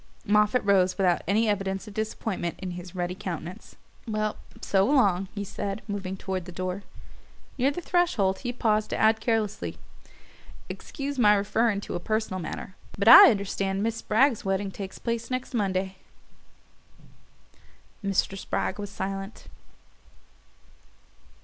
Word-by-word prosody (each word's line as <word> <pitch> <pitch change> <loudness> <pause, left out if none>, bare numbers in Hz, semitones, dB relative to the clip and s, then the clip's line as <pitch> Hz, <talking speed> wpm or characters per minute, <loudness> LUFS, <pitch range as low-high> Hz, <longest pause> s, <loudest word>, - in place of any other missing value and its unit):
Moffatt 210 +3 +3
rose 190 -2 +3
without 185 -3 +2
any 215 +4 +2
evidence 195 0 -1
of 210 - -9
disappointment 215 -4 -3
in 185 -2 -5
his 180 +1 -8
ruddy 175 0 -2
countenance. 180 -2 -7 0.3
"Well, 215 -1 -1 0.2
so 195 -1 +2
long," 200 -8 +3
he 205 - -3
said, 200 +1 -5
moving 195 -2 -4
toward 190 -2 -4
the 180 - -8
door. 185 +2 -4 0.8
Near 260 +3 +4
the 290 +5 -4
threshold 240 - +1
he 245 - -3
paused 215 -3 +1
to - - -2
add 220 0 +4
carelessly: 225 -2 -1 0.9
"Excuse 280 -2 -5
my 210 -3 +6
referring 205 +1 +1
to - - -6
a 175 - -2
personal 215 -1 -2
matter 180 +2 -6 0.2
but 200 +2 -1
I - - +12
understand 195 -2 -1
Miss 225 0 -1
Spragg's 235 +3 +2
wedding 195 0 -1
takes 195 -1 -7
place 235 -1 -3
next 255 +1 -3
Monday." 190 -3 -1 2.1
Mr. 195 0 0
Spragg 195 +1 -3
was 205 -1 -5
silent. 195 +1 -5
200 Hz, 135 wpm, -27 LUFS, 190-220 Hz, 2.1 s, I